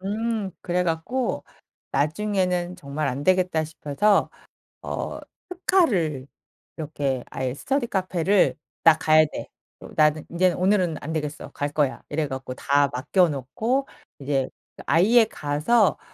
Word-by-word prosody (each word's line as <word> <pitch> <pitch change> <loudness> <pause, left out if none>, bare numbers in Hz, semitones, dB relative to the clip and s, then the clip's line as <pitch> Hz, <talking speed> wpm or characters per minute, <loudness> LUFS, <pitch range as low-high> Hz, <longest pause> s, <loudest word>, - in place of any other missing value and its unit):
음 215 +1 -2
그래 180 0 0
갖고 180 +10 -2 0.5
나중에는 180 +3 0
정말 150 -2 -3
안 135 +3 -3
되겠다 180 -2 +2
싶어서 160 +6 +1 0.5
어 - - -4 0.3
특활을 210 - +1 0.5
이렇게 145 -5 -2
아예 130 -1 -2
스터디 265 - -1
카페를 185 0 +2 0.3
"나 165 -1 +8
가야 155 0 +5
돼. - - -6 0.3
어 - - -10
나는 155 0 +3
인제 180 +1 +2
오늘은 185 -3 +2
안 155 - -5
되겠어 150 -2 -4
갈 145 - -2
거야." 145 -3 0
이래 150 0 -1
갖고 130 -1 -5
다 140 +2 +2
맡겨 150 +8 +2
놓고 220 - -2 0.3
이제 135 -1 0 0.3
그 - - -10
아예 220 +8 +5
가서 180 +5 +1
165 Hz, 255 characters per minute, -24 LUFS, 145-200 Hz, 0.5 s, 나